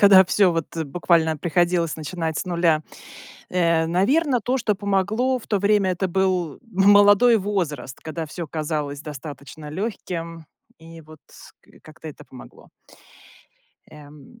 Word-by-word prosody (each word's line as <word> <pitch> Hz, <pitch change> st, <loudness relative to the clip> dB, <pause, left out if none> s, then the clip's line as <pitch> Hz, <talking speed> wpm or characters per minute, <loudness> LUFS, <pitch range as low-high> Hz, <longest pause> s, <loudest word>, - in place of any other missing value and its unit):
когда 195 Hz, -2 st, +8 dB
всё 190 Hz, +1 st, +3 dB
вот, 165 Hz, -1 st, -4 dB
э, 160 Hz, -, -2 dB
буквально 160 Hz, +1 st, +1 dB
приходилось 175 Hz, 0 st, 0 dB
начинать 160 Hz, 0 st, -4 dB
с -, -, -3 dB
нуля. 170 Hz, -3 st, +1 dB, 0.7 s
Э, 170 Hz, -2 st, +2 dB
наверное, 250 Hz, -, +1 dB
то, 250 Hz, +5 st, 0 dB
что 220 Hz, -4 st, 0 dB
помогло, 205 Hz, +6 st, 0 dB
в -, -, -16 dB
то 205 Hz, -, +1 dB
время 200 Hz, -1 st, +2 dB
это 185 Hz, +1 st, -2 dB
был 180 Hz, -4 st, -1 dB
молодой 205 Hz, +2 st, +5 dB
возраст, 170 Hz, -, -3 dB
когда 160 Hz, +1 st, -5 dB
всё 165 Hz, +3 st, -7 dB
казалось 150 Hz, -2 st, -4 dB
достаточно 150 Hz, +1 st, -9 dB
лёгким, 170 Hz, -3 st, -5 dB, 0.3 s
и 165 Hz, 0 st, -13 dB
вот 155 Hz, 0 st, -16 dB
с -, -, -16 dB
ка -, -, -25 dB
как-то 155 Hz, +1 st, -12 dB
это -, -, -13 dB
помогло. 125 Hz, -2 st, -15 dB, 1.2 s
Эм, 150 Hz, -, -15 dB
170 Hz, 140 wpm, -22 LUFS, 155-200 Hz, 1.2 s, когда